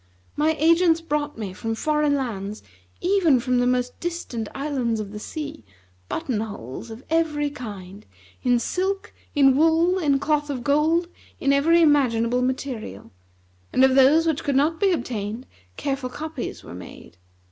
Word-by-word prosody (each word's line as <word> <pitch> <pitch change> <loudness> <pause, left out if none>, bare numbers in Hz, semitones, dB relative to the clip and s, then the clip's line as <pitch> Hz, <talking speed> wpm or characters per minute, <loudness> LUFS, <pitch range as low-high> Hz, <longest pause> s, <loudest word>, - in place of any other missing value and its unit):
My 310 +2 +2
agents 330 +1 +4
brought 300 -4 -2
me 205 -4 -5
from 225 +3 -3
foreign 300 +3 +1
lands, 215 -6 -4 0.4
even 350 -8 +3
from 250 0 +1
the 245 - +2
most 250 0 0
distant 335 -11 -4
islands 265 -6 -1
of 205 -2 -5
the 210 - -7
sea, 300 - -6 0.5
button 240 -6 -2
holes 200 - -6
of 225 +4 -9
every 300 -3 +1
kind; 205 -7 -9 0.4
in 245 -1 +3
silk, 380 +10 -2 0.2
in 270 -2 +5
wool, 330 +5 +3
in 285 -5 +2
cloth 295 +1 0
of 260 -4 -3
gold, 315 +6 +2 0.3
in 275 0 +2
every 330 +5 +4
imaginable 250 -5 +3
material, 250 - -4 0.6
and 260 - +3
of 265 0 +5
those 275 +5 +5
which 320 -3 0
could 280 - 0
not 305 +4 +2
be 395 -2 +3
obtained 235 - -3 0.3
careful 270 -2 -2
copies 305 0 -6
were 85 - -10
made. 90 -1 -11
275 Hz, 155 wpm, -24 LUFS, 235-315 Hz, 0.6 s, in